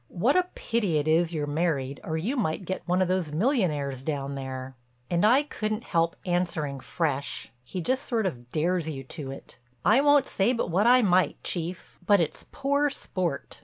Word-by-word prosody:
What 230 - +1
a 365 0 +3
pity 210 -9 0
it 150 +1 0
is 165 +2 +3
you're 155 -3 -2
married 145 -3 -1
or 160 - -2
you 215 - -1
might 190 - -1
get 190 +2 -3
one 180 +1 +3
of - - -1
those 180 -4 0
millionaires 155 - 0
down 140 -1 -3
there." 130 -1 -6 0.4
And 175 +1 +2
I 250 +7 +5
couldn't 215 -5 -3
help 165 -4 +1
answering 170 -6 -1
fresh—he 140 -1 -3
just 260 +9 -1
sort 225 -4 0
of 120 -9 -4
dares 165 +1 0
you 135 -3 -5
to 135 +1 -7
it: 135 - -10 0.3
"I 230 +6 +6
won't 290 -1 +5
say 200 +6 +1
but 230 -7 -2
what 200 +6 +3
I 250 0 +6
might, 185 -2 +3
Chief. 175 0 -4
But 200 +2 +5
it's 165 -3 -2
poor 285 +1 +1
sport. 180 - -4
175 Hz, 185 wpm, -27 LUFS, 145-215 Hz, 0.4 s, I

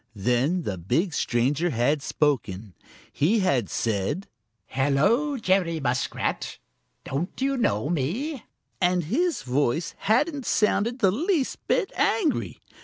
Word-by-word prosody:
Then 125 - +1
the 95 - -3
big 140 - 0
stranger 135 +7 +1
had 140 +3 +1
spoken. 115 - -1 0.4
He 205 +9 +2
had 135 - +1
said: 110 - -1 0.4
"Hello, 155 - +1
Jerry 185 -6 +1
Muskrat! 125 -3 -2 0.5
Don't 155 +8 -4
you 275 +1 +1
know 205 - 0
me?" 200 - -2 0.4
and 180 -1 +2
his 320 - 0
voice 140 +5 0
hadn't 280 +5 +1
sounded 220 +2 +1
the 195 -3 +5
least 310 - 0
bit 445 -6 +1
angry. 335 -10 0
170 Hz, 115 wpm, -25 LUFS, -, 0.5 s, the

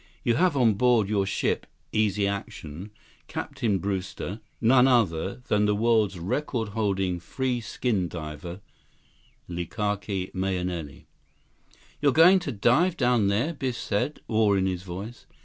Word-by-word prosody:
You 120 - +2
have 165 +3 +2
on 120 -4 +4
board 115 -1 +3
your 100 -2 +1
ship - - -1 0.2
Easy 105 -2 +1
Action, 95 -2 -6 0.4
Captain 105 -5 -2
Brewster, 95 +1 -4 0.2
none 125 +2 +5
other 100 -3 +1
than 105 0 +2
the 105 - +2
world's 110 -3 +2
record 110 - -2
holding 95 -4 -1
free 125 +7 -2
skin 105 -4 -1
diver, 85 +3 -7 0.9
Likake 95 +2 -3
Mahenili." 90 -5 -3 1.0
"You're 140 -2 +4
going 180 +4 +7
to 175 -6 -4
dive 130 - +2
down 120 -5 +3
there?" 115 +12 +1
Biff 130 -5 -3
said, 105 +8 -2
awe 110 -2 +3
in 95 -1 +1
his 90 -2 -1
voice. 95 +6 -8
105 Hz, 130 wpm, -26 LUFS, 95-120 Hz, 1.0 s, going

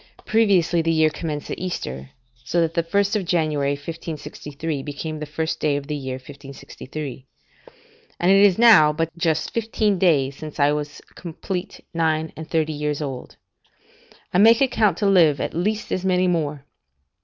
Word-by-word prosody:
Previously 195 -6 +3
the 165 0 0
year 160 -1 +3
commenced 150 -2 -5
at - - -4
Easter, 65 - -5 0.3
so 170 +7 -1
that 165 -1 +1
the 170 - +1
1st 200 +4 0
January 155 -5 0
1563 150 -1 -6
became 150 +2 -6
the 150 - -6
first 160 +2 -3
day 150 -2 +1
of 140 -1 -4
the 150 +1 -4
year 130 -2 -4
1563.] 135 0 -9 0.9
and 175 +2 +3
it 195 +1 +6
is 195 -3 +5
now 220 -11 +7
but 165 +1 -3
just 165 -3 -1
fifteen 215 -3 0
days 140 -7 +2
since 155 +1 -9
I 145 0 +4
was 150 0 -4
complete 180 +2 -6
nine 160 -1 0
and 160 0 -9
thirty 160 -1 0
years 150 -1 -2
old; 135 -4 -6 1.0
I 180 - +3
make 225 +3 +7
account 215 -9 +2
to 205 - -1
live, 170 -8 +4
at - - -3
least, 210 +6 -2
as 185 - -1
many 185 -1 +2
more. 150 -5 -1
160 Hz, 165 wpm, -22 LUFS, 145-180 Hz, 1.0 s, now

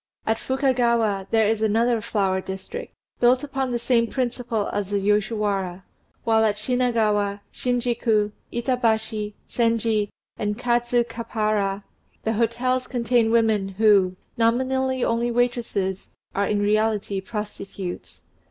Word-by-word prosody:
At 225 0 +1
Fukagawa 235 -7 +1
there 220 -2 +3
is 220 0 0
another 225 +2 +2
Flower 195 -3 0
District, 190 0 -7 0.3
built 250 +2 +4
upon 270 -2 -2
the 240 - 0
same 235 -1 +2
principle 240 -4 -2
as 205 -2 -2
the 205 - 0
Yoshiwara; 200 -2 0 0.4
while 225 -1 +3
at 215 -2 +2
Shinagawa, 215 -4 +1
Shinjiku, 235 -4 +1 0.2
Itabashi, 220 -4 0
Senji, 230 -3 +1 0.3
and 210 0 -2
Kadzukappara, 230 -4 0 0.4
the 220 - 0
hotels 245 +3 0
contain 240 -2 +2
women 220 -4 +3
who, 195 -2 +4 0.2
nominally 260 +3 +1
only 235 +1 +1
waitresses, 235 -6 -1 0.2
are 200 0 +1
in 205 -1 +1
reality 210 -2 +1
prostitutes. 195 -3 -6
225 Hz, 115 wpm, -24 LUFS, 205-240 Hz, 0.4 s, built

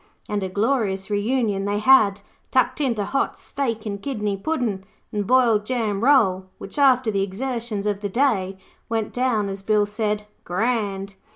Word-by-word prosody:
And 210 -1 -2
a 190 - -2
glorious 205 -2 0
reunion 205 -1 0
they 205 0 0
had, 210 -3 +5 0.3
tucking 255 +2 +2
into 220 -5 -1
hot 275 - -1
steak 235 -6 -3
and 200 -2 -4
kidney 210 -7 -2
puddin' 220 -4 -2 0.3
and 205 -2 -2
boiled 240 -5 +4
jam 220 -3 -1
roll, 195 -9 +4
which, 200 +9 -7
after 255 -4 +4
the 200 -1 0
exertions 225 +1 -3
of 205 -1 -1
the 205 - -2
day, 195 -6 +1 0.3
went 225 -2 -2
down, 245 -5 +1
as 195 0 -5
Bill 210 +1 +2
said, 210 0 -2 0.2
'Grand'. 200 -1 -1
210 Hz, 160 wpm, -23 LUFS, 200-250 Hz, 0.3 s, had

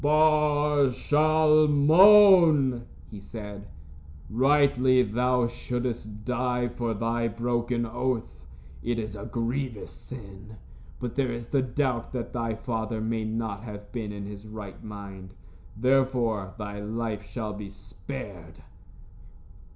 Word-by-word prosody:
"Bar 150 -1 +3
Shalmon," 155 - +5 0.3
he 105 - -8
said, 105 -1 -9 0.6
"rightly 130 0 +4
thou 125 +3 +1
shouldst 120 -3 -4
die 125 -1 0
for 120 -2 -3
thy 115 +2 -1
broken 120 +1 -1
oath. 115 - -3 0.3
It 120 0 -2
is 110 -2 -4
a 100 - -7
grievous 120 -1 -3
sin. 100 -4 -11 0.4
But 125 -2 -4
there 135 -3 0
is 120 0 -6
the 140 - +2
doubt 130 -2 -2
that 120 -1 -4
thy 115 -2 -2
father 110 -1 -3
may 110 0 -2
not 110 -2 -3
have 105 -2 -9
been 110 -4 -4
in 100 -1 -7
his 100 +1 -9
right 105 -3 -9
mind. 100 -3 -9 0.4
Therefore, 120 -6 +1
thy 105 -1 -6
life 110 0 -4
shall 105 +1 -5
be 105 -1 -7
spared." 100 - -9
120 Hz, 120 wpm, -27 LUFS, 105-130 Hz, 0.6 s, Shalmon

